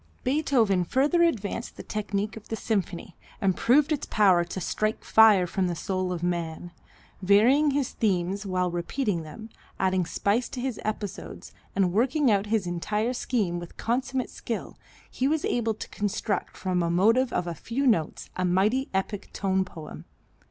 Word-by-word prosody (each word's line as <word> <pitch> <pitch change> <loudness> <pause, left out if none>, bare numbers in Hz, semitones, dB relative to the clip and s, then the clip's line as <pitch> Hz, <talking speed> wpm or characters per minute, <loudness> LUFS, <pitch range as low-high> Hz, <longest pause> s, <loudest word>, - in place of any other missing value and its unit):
Beethoven 250 - +2
further 280 - +2
advanced 235 - -1
the - - -7
technique 210 0 -3
of 220 -1 -12
the 225 - -2
symphony, 195 -5 -3 0.2
and 190 -2 +1
proved 285 +5 +3
its 295 - -1
power 190 -5 +4
to 175 +2 -6
"strike 215 +4 -1
fire 215 -4 +6
from 185 +1 -1
the 175 - -2
soul 185 +1 -2
of 175 -1 -4
man." 175 -1 -3 0.5
Varying 230 +10 +5
his 280 -2 0
themes 195 -1 0
while 185 -2 -1
repeating 175 +2 -1
them, 215 +8 -10 0.3
adding 185 -2 +1
spice 215 +8 0
to 255 - -6
his 250 -2 -3
episodes 210 -2 -5 0.2
and 185 -3 +2
working 255 +4 +3
out 200 0 +1
his 215 -2 +1
entire 210 +7 -1
scheme 210 -9 -1
with 175 -1 -10
consummate 255 +2 -1
skill, 230 - -5 0.3
he 260 - -1
was 310 +1 0
able 230 -2 0
to - - -7
construct 205 -1 -2
from 185 -1 -1
a 170 - 0
motive 225 +9 +3
of - - -1
a 170 - -3
few 235 - -3
notes 190 - 0
a 185 - -1
mighty 200 +9 +2
epic 195 +1 -2
tone 190 -1 +1
poem. 160 -4 -10
205 Hz, 165 wpm, -26 LUFS, 180-240 Hz, 0.5 s, fire